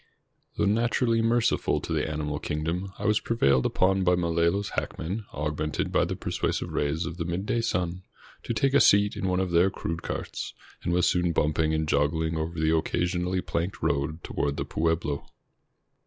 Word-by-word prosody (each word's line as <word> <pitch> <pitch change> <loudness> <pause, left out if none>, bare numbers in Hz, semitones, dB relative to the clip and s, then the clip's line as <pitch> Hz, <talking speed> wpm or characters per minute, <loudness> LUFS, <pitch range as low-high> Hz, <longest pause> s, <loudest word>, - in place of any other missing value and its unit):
Though - - +2
naturally 115 +2 +2
merciful 115 +1 +2
to - - -4
the - - 0
animal 75 -1 -3
kingdom, 80 +6 -3
I - - -6
was 105 0 +3
prevailed 70 - +2
upon 95 +1 +2
by 90 0 +4
Malolos 85 +3 +1
" - - -6
hackmen," 95 +6 -3
augmented 75 +1 -2
by - - +3
the - - -3
persuasive - - -2
rays 75 +4 0
of 85 0 -5
the 85 - -2
midday 95 +7 -1
sun, 90 -5 -1 0.4
to - - -4
take 135 +5 +2
a 140 - +6
seat 100 0 +5
in 95 - -2
one 90 0 +1
of 95 -2 -1
their 85 +3 +4
crude 85 -3 -4
carts, - - -5 0.3
and - - -2
was 90 +1 +3
soon 90 -1 +2
bumping 80 +1 +1
and 80 0 -1
joggling 80 +2 +1
over 80 +1 -3
the 80 +1 +3
occasionally 90 +3 0
planked 90 +6 -3
road 75 +3 -1
toward 70 0 -2
the - - -2
pueblo. 80 -3 -1
85 Hz, 180 wpm, -27 LUFS, 80-95 Hz, 0.4 s, a